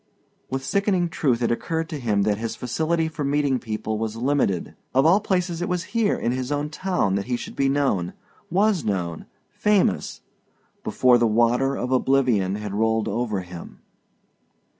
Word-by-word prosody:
With 135 0 -3
sickening 190 -1 +1
truth 125 -7 0
it 115 - +2
occurred 160 +7 -2
to 155 -3 -4
him 105 -5 +1
that 105 0 +1
his 115 0 -3
facility 160 +6 0
for 155 -2 -4
meeting 140 -2 +1
people 110 -1 -3
was 110 -1 -3
limited. 120 -7 0 0.2
Of 135 +2 +4
all 180 +5 +6
places 180 -4 -1
it 175 - -2
was 180 -1 -1
here 225 -3 +2
in 120 - -1
his 130 +2 -3
own 145 +1 -1
town 180 - 0
that 100 0 -1
he 125 - 0
should - - -8
be 135 0 +2
known, 135 -11 0 0.4
was 195 -1 +2
known 90 -5 -3 0.2
famous 210 -2 +1 0.6
before 125 -1 +4
the 120 - +3
water 120 +5 +2
of 125 - -3
oblivion 125 -7 +2
had 105 -1 -5
rolled 110 +1 +1
over 110 -5 -1
him. 90 -1 -10
130 Hz, 170 wpm, -24 LUFS, 110-160 Hz, 0.6 s, all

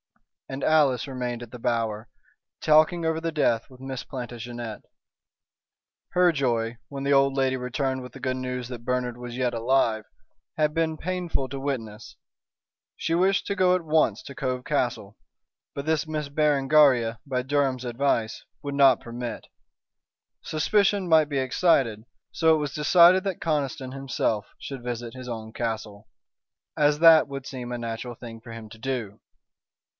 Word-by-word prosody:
And 135 +1 -5
Alice 145 -5 +3
remained 125 -2 -4
at 115 - -12
The 125 - -9
Bower, 115 -2 -1 0.5
talking 155 +2 +4
over 160 0 0
the 165 0 -2
death 120 -7 +1
with 130 -1 -16
Miss 130 -1 -5
Plantagenet. 120 -2 -7 1.3
Her 180 -1 +4
joy, 120 -5 0
when 140 -1 -6
the 140 0 +2
old 135 0 +3
lady 130 -1 +2
returned 130 +1 -2
with 125 -1 -9
the 135 - -11
good 130 0 -1
news 125 -1 -4
that 120 -2 -8
Bernard 125 -1 -1
was 120 0 -8
yet 125 -2 0
alive, 115 -2 +1 0.5
had 150 -1 +2
been 160 -1 0
painful 175 -6 -2
to 135 +1 -5
witness. 115 -6 -5 0.8
She 165 - -1
wished 190 +3 +2
to 200 - -1
go 185 -1 +4
at 180 -2 -3
once 155 -9 +2
to 140 - -10
Cove 125 0 -3
Castle, - - -2 0.6
but 140 - -5
this 160 0 0
Miss 155 -2 -3
Berengaria, 140 -5 +3
by 130 -3 -1
Durham's 135 -2 0
advice, 120 -2 -1 0.2
would 140 -1 -4
not 135 -3 +6
permit. 120 -1 -6 0.9
Suspicion 200 +4 +1
might 160 -3 +5
be 145 - -2
excited, 130 -4 +2 0.3
so 160 -1 +4
it - - -1
was 145 -2 -3
decided 175 +4 +6
that 195 -3 -3
Conniston 140 -5 -2
himself 125 -5 -1
should 135 -3 -7
visit 120 -1 -5
his 130 -1 -8
own 110 -1 -6
castle, 110 -2 -4 0.7
as 150 0 +3
that 160 -2 +7
would 135 -1 -6
seem 125 -2 -6
a 120 - -2
natural 115 +1 -5
thing 115 -1 -10
for 115 0 -11
him 115 -1 -8
to 110 +1 -13
do. 115 -5 -4
130 Hz, 160 wpm, -26 LUFS, 120-150 Hz, 1.3 s, that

